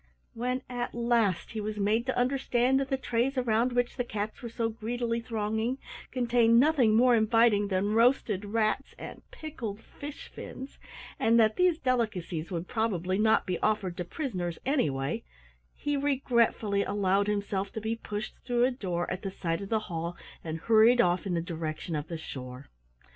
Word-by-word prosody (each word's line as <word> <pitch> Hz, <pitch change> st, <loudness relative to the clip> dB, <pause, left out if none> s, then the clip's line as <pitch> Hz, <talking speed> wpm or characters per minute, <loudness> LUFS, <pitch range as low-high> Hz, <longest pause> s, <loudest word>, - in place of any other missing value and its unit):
When 250 Hz, +2 st, -2 dB
at 245 Hz, -1 st, -4 dB
last 235 Hz, -6 st, +1 dB
he 220 Hz, -, -4 dB
was 210 Hz, 0 st, -4 dB
made 215 Hz, +4 st, +1 dB
to 260 Hz, -, -1 dB
understand 255 Hz, 0 st, +2 dB
that 270 Hz, -1 st, -2 dB
the 270 Hz, -, +1 dB
trays 255 Hz, +1 st, -1 dB
around 240 Hz, 0 st, +2 dB
which 245 Hz, +1 st, 0 dB
the 245 Hz, -, +1 dB
cats 215 Hz, -2 st, -4 dB
were 235 Hz, -, -5 dB
so 230 Hz, 0 st, -1 dB
greedily 230 Hz, +1 st, -2 dB
thronging 220 Hz, +2 st, -1 dB, 0.3 s
contained 235 Hz, -2 st, +4 dB
nothing 260 Hz, -6 st, +4 dB
more 245 Hz, +1 st, +6 dB
inviting 220 Hz, -2 st, +4 dB
than 200 Hz, +2 st, 0 dB
roasted 230 Hz, -4 st, +3 dB
rats 215 Hz, +5 st, -1 dB
and -, -, -9 dB
pickled 235 Hz, -10 st, -6 dB
fish 285 Hz, +5 st, -9 dB
fins, 265 Hz, +2 st, -9 dB, 0.4 s
and 230 Hz, +1 st, +4 dB
that 220 Hz, -1 st, +4 dB
these 360 Hz, -3 st, +3 dB
delicacies 210 Hz, -, -1 dB
would 175 Hz, -1 st, -4 dB
probably 190 Hz, -5 st, -1 dB
not 220 Hz, +1 st, +3 dB
be 185 Hz, -2 st, -2 dB
offered 205 Hz, -5 st, 0 dB
to 180 Hz, -, -2 dB
prisoners 180 Hz, -, -4 dB
anyway, 160 Hz, -, 0 dB, 0.5 s
he 290 Hz, 0 st, -2 dB
regretfully 240 Hz, -7 st, +1 dB
allowed 200 Hz, 0 st, +1 dB
himself 200 Hz, -1 st, -1 dB
to -, -, -3 dB
be 220 Hz, +1 st, -2 dB
pushed 210 Hz, -1 st, -5 dB
through 240 Hz, -1 st, +1 dB
a 260 Hz, -, +2 dB
door 180 Hz, -8 st, -2 dB
at 185 Hz, +1 st, -3 dB
the 195 Hz, -, -3 dB
side 170 Hz, -2 st, -3 dB
of 200 Hz, -, -6 dB
the 220 Hz, -1 st, +1 dB
hall 170 Hz, -3 st, -4 dB, 0.3 s
and 160 Hz, 0 st, -5 dB
hurried 230 Hz, +4 st, +5 dB
off 180 Hz, -2 st, +2 dB
in 180 Hz, -, 0 dB
the 165 Hz, -, 0 dB
direction 165 Hz, -1 st, -4 dB
of 150 Hz, +1 st, -3 dB
the 165 Hz, -, -4 dB
shore. 130 Hz, -3 st, -8 dB
220 Hz, 175 wpm, -29 LUFS, 195-245 Hz, 0.5 s, more